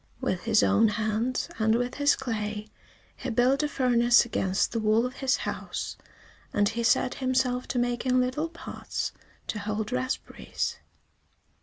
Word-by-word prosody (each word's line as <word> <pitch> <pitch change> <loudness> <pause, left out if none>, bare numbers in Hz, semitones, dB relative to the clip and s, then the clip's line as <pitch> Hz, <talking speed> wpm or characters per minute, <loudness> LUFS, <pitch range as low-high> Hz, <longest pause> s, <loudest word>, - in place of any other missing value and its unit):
With 180 +2 -2
his 220 -2 +4
own 225 - +4
hands, 220 +3 -1
and 220 0 +3
with 245 +1 -1
his 285 0 +3
clay, 215 -4 -3 0.5
he 260 - -4
built 250 +4 +3
a 300 - +1
furnace 240 -4 +4
against 190 -4 0
the 230 - -1
wall 220 +2 +3
of 255 +1 -5
his 265 0 +2
house, - - -4 0.6
and 205 - +2
he 230 +1 -3
set 235 +2 +3
himself 255 -1 +1
to - - -3
making 245 +1 +1
little 255 +6 0
pots - - -5 0.3
to 210 - -3
hold 210 +2 -3
raspberries. 255 +1 -3
240 Hz, 150 wpm, -27 LUFS, 220-255 Hz, 0.6 s, his